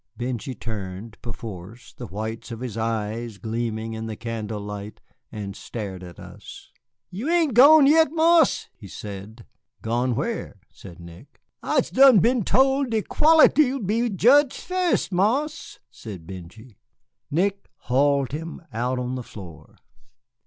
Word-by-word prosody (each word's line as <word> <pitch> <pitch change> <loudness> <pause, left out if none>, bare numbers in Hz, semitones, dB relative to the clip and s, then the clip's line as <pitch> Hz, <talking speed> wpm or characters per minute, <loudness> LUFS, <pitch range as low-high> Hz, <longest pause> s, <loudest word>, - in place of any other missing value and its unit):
Benjy 125 +1 -4
turned, 105 0 -7
perforce, 110 0 -9
the 120 - -8
whites 110 +4 -6
of 115 -1 -7
his 125 -5 -5
eyes 115 0 -3
gleaming 115 +1 -4
in 110 0 -5
the 110 - -5
candle 110 -1 -5
light, 105 0 -7 0.3
and 100 -3 -6
stared 100 -5 -7
at 90 -2 -11
us. - - -12 0.4
"You 220 - -4
ain't 335 -6 +2
gone 285 +5 +8
yit, 320 +3 +5
Marse," 325 -1 +3
he 100 - -12
said. 105 +4 -9 0.4
"Gone 120 +2 0
where?" 140 - -4
said 90 -2 -13
Nick. 85 0 -14 0.2
"I'se - - 0
done 265 +3 +7
been 235 +3 +3
tole 270 +6 +3
de 225 -4 -1
quality 310 -3 +5
'll 275 - -2
be 230 +3 0
jedged 255 +8 +4
fust, 365 - -1
Marse," 260 - -1
said 95 -7 -10
Benjy. 95 +6 -11 0.5
Nick 195 +6 -1
hauled 140 +1 +1
him 165 +3 -6
out 125 +3 -1
on 125 0 -3
the 130 - -4
floor. 95 -8 -12
120 Hz, 140 wpm, -24 LUFS, -, 0.5 s, gone